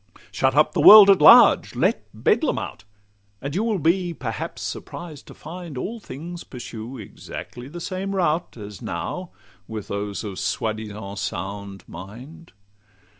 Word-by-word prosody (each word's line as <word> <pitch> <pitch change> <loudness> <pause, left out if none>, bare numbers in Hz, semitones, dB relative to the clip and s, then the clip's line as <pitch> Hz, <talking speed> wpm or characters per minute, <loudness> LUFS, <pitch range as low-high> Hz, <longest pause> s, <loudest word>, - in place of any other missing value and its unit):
Shut 130 +6 +1
up 150 +1 +4
the - - +1
world 210 -2 +11
at 190 -5 +3
large, - - +7
let - - 0
Bedlam - - +1
out; 90 - -6 0.6
And 140 +3 -5
you 195 +6 0
will 225 -3 0
be 175 +1 0
perhaps 115 -8 -5
surprised 160 -5 -7
to - - -12
find 165 -2 -9
All 225 - -4
things 170 0 -8
pursue 120 0 -8
exactly 120 +3 -9
the 170 +5 -8
same 190 +3 -4
route, 170 -5 -1
As 105 -3 -9
now 175 - -5 0.4
with 110 -2 -7
those 100 +1 -4
of 100 -3 -6
soi 110 +2 -1
disant 105 -2 -8
sound 100 +1 -5
mind. 125 - -11
130 Hz, 150 wpm, -23 LUFS, 105-175 Hz, 0.6 s, world